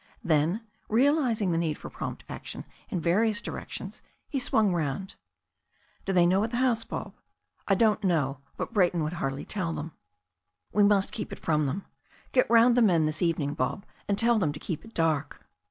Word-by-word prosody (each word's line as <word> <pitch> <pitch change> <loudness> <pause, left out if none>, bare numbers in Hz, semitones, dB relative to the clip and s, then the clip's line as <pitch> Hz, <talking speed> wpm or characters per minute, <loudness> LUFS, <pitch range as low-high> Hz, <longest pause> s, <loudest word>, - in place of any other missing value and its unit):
Then, 160 +6 +2 0.3
realizing 240 - +2
the 165 - +1
need 160 -3 0
for - - -9
prompt - - -6
action - - -7 0.2
in 180 - -1
various 210 +6 +2
di - - -5
rections, - - -7 0.3
he 280 - -2
swung 215 -6 +2
round. 165 +3 -2 0.9
"Do 195 - 0
they 180 -2 +5
know 190 +3 +3
at 225 - -1
the 240 - -3
house, 245 -3 +2
Bob?" - - -6 0.5
"I 195 - +4
don't 215 0 +3
know. 145 -8 +1 0.2
But - - -4
Brayton 180 -5 +3
would 155 +3 -2
hardly 135 +1 -2
tell 185 -6 -2
them." 160 +2 -5 0.8
"We 210 - +3
must 200 -1 +4
keep 215 - -5
it - - -6
from 155 -4 +1
them. 180 +9 -3 0.5
Get 255 - +3
round 235 +1 +6
the 245 - +4
men 175 -8 +4
this 155 0 -2
evening. 160 -5 +1
Bob, 140 +11 -2 0.2
and 200 - +1
tell 235 +1 +3
them 160 -7 +1
to 150 - -8
keep 165 -5 -4
it 225 0 -15
dark. 155 -3 0
185 Hz, 190 wpm, -28 LUFS, 160-220 Hz, 0.9 s, round